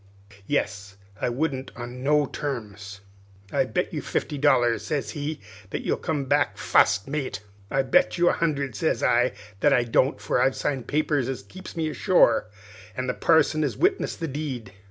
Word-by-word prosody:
Yes, 100 -8 -2 0.2
I - - +1
wouldn't 135 0 -2
on 125 +1 -7
no 145 +2 +3
terms. 105 -8 -6 0.5
"'I'll - - +2
bet - - -2
you - - -2
fifty 150 - -2
dollars,' 120 -5 +3
sez 150 -3 -2
he, 150 +1 -4 0.3
'that - - -4
you'll - - 0
come 150 -4 -2
back 145 +2 +1
fust 100 -1 +3
mate.' 135 -8 -3 0.3
"'I'll 135 - +1
bet 110 -4 +3
you 175 - +3
a - - +2
hundred,' 145 -5 -1
sez 160 - 0
I, 120 +2 +3 0.3
'that 145 +5 +4
I 125 - +4
don't, 130 +4 +2
for - - 0
I've 130 +1 +3
signed 130 -5 -2
papers 145 -3 0
as 125 -6 -4
keeps 185 - -11
me 160 -1 0
ashore, 155 - +3 0.5
an' 130 - -1
the 125 - -1
parson 160 -1 +3
has 150 - -1
witnessed 385 +2 +1
the 165 - -2
deed.' 130 -8 -5
135 Hz, 175 wpm, -25 LUFS, 120-150 Hz, 0.5 s, that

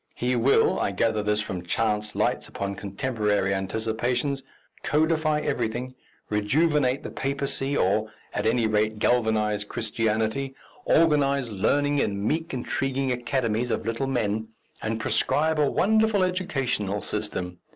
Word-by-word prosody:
He 125 +1 0
will 125 +3 +3
I - - +1
gather 110 +2 +1
this 105 0 +1
from 95 -3 -4
chance 105 +3 -1
lights - - 0
upon 100 0 -4
contemporary 105 0 -1
anticipations 115 +7 -1 0.4
codify 155 0 +1
everything, 125 -2 -2 0.3
rejuvenate 135 +5 +2
the - - -6
papacy, 140 0 -1
or, 105 +3 +1 0.2
at - - 0
any 115 0 +2
rate, 110 0 +1
galvanize 110 -3 +1
Christianity, 110 +5 -1 0.3
organize 140 -6 +3
learning 145 +8 +1
in 100 -4 -1
meek 165 +4 -1
intriguing 130 +1 -1
academies 120 -1 -1
of - - -2
little 115 +4 -1
men, 110 -4 -1 0.3
and 110 +1 -2
prescribe 155 +7 +1
a 145 -2 +3
wonderful 220 -1 +3
educational 135 - -1
system. 90 -4 -4
120 Hz, 125 wpm, -26 LUFS, 105-140 Hz, 0.4 s, will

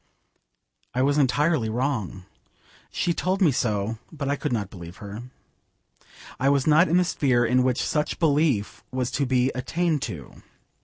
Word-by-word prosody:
I 130 - +2
was 145 +2 +2
entirely 145 -2 +2
wrong. 110 -6 -2 0.7
She 170 - 0
told 185 +3 -1
me 175 -7 +4
so, 110 -2 -1
but 145 -4 -4
I 140 - +1
could - - -3
not 105 -5 -2
believe 85 -1 -10
her. 100 +2 -8 1.2
I 135 - +3
was 140 -2 +2
not 155 +4 +5
in 170 - +3
the 180 - +3
sphere 130 -7 +2
in 125 +2 +3
which 125 -1 +1
such 150 -1 -1
belief 135 - +1
was 130 -1 -2
to 140 +1 -1
be 130 +1 +2
attained 160 +4 -1
to. 70 -6 -9
130 Hz, 160 wpm, -25 LUFS, 110-150 Hz, 1.2 s, not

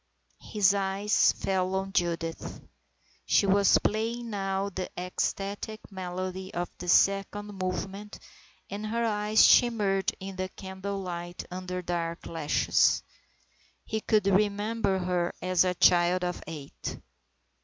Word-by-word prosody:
His 200 -2 +2
eyes 200 +1 +2
fell 185 -1 -1
on 195 0 -2
Judith. 170 -2 -2 0.7
She - - +4
was 200 +1 +5
playing 230 +2 -1
now 195 -1 -1
the 185 -1 -5
ecstatic 195 +4 -3
melody 185 0 -5
of 175 0 -2
the 180 - -7
second 200 +2 +2
movement, 195 +3 -4 0.5
and 210 +2 -5
her 230 +2 0
eyes 210 0 +4
shimmered 205 -5 +4
in 190 0 -7
the 185 0 -2
candle 190 +1 -6
light 175 -1 -6
under 180 0 -5
dark 170 -1 -3
lashes. 160 -3 +2 0.8
He 220 0 -2
could 215 -2 +2
remember 205 +1 +1
her 180 -1 -1
as 185 -1 +2
a 180 -1 0
child 175 +1 +4
of 180 0 -3
eight. 150 -4 -7
190 Hz, 125 wpm, -28 LUFS, 180-205 Hz, 0.8 s, was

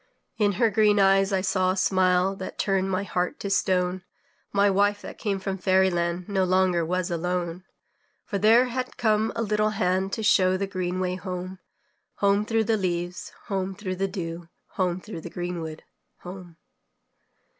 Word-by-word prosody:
In 205 -1 +3
her 225 +4 +2
green 210 0 +4
eyes 195 0 +4
I 190 -1 +1
saw 185 -1 +1
a 185 - 0
smile 185 0 +2
That 190 -1 -7
turned 195 -1 0
my 190 +1 0
heart 180 -2 -2
to 200 - -3
stone, 185 -2 +1 0.5
My 200 0 +3
wife 205 +1 +2
that - - -9
came 200 -3 -1
from 195 0 -4
fairy 190 0 +3
land 175 +1 -2
No 195 -2 +1
longer 185 -2 +2
was 180 +2 -1
alone. 175 +1 -2 0.6
For 200 - -3
there 225 +5 +6
had 255 +1 -4
come 220 -2 +2
a 230 - -1
little 215 0 +1
hand 185 +1 +1
To 220 - -2
show 185 -3 +4
the 200 - -1
green 185 -2 -3
way 185 0 -1
home, 185 0 -6 0.6
Home 200 +1 +2
through 225 0 +2
the 220 0 +1
leaves, 175 -2 -3
home 195 -2 -2
through 185 -1 -5
the 195 +1 0
dew, 170 -3 -6 0.2
Home 180 -2 -1
through 185 -4 -8
the 175 - -7
greenwood 170 -3 -5 0.4
home. 180 -2 -10
190 Hz, 175 wpm, -25 LUFS, 180-200 Hz, 0.6 s, there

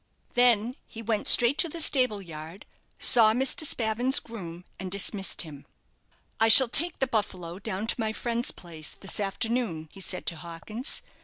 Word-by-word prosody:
Then 245 +1 +2
he 225 - -10
went 215 -1 -1
straight 245 +3 +4
to 340 - +3
the 335 - -7
stable 255 -9 +1
yard, 165 +2 -10 0.3
saw 220 -3 +5
Mr. 265 +5 0
Spavin's 240 +3 +1
groom, 180 -6 -10
and 185 0 -6
dismissed 195 0 0
him. 145 -4 -12 0.7
"I 225 - +4
shall 240 +2 +9
take 325 +7 +3
the 265 - 0
'Buffalo' 190 -7 -4
down 205 0 -5
to 230 - -3
my 220 -1 -1
friend's 235 +2 -2
place 160 -3 -6
this 195 - -3
afternoon," 200 -5 -3
he - - -14
said 180 -1 -2
to 170 - -4
Hawkins. 170 - -6
215 Hz, 165 wpm, -26 LUFS, 180-245 Hz, 0.7 s, shall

